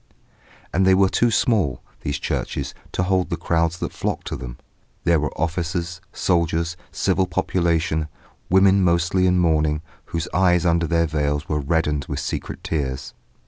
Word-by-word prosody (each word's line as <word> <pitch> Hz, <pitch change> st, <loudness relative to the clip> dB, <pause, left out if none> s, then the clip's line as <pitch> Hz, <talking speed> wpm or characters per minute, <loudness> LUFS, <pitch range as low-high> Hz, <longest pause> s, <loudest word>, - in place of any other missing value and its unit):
And 95 Hz, -, +3 dB
they 95 Hz, 0 st, +5 dB
were 95 Hz, 0 st, +4 dB
too 120 Hz, +4 st, +2 dB
small, 105 Hz, -, +1 dB, 0.2 s
these 70 Hz, -, -2 dB
churches, -, -, -3 dB, 0.2 s
to 90 Hz, -, 0 dB
hold 95 Hz, 0 st, +1 dB
the -, -, -2 dB
crowds 85 Hz, 0 st, 0 dB
that -, -, -4 dB
flocked -, -, -3 dB
to -, -, -3 dB
them. -, -, -7 dB, 0.5 s
There 85 Hz, -2 st, +3 dB
were 75 Hz, -, -1 dB
officers, 85 Hz, +1 st, -2 dB
soldiers, 85 Hz, -1 st, 0 dB, 0.2 s
civil 95 Hz, -1 st, +1 dB
population, 85 Hz, -3 st, 0 dB, 0.4 s
women 95 Hz, +1 st, +5 dB
mostly 90 Hz, +2 st, +2 dB
in 90 Hz, 0 st, +3 dB
mourning, 80 Hz, -3 st, +2 dB, 0.2 s
whose 85 Hz, -1 st, -3 dB
eyes 90 Hz, 0 st, +3 dB
under 85 Hz, -1 st, +2 dB
their 85 Hz, +1 st, +2 dB
veils 75 Hz, -1 st, -1 dB
were 75 Hz, -, 0 dB
reddened 75 Hz, -1 st, 0 dB
with -, -, -2 dB
secret -, -, -4 dB
tears. 70 Hz, -4 st, -3 dB
85 Hz, 155 wpm, -22 LUFS, 80-90 Hz, 0.5 s, they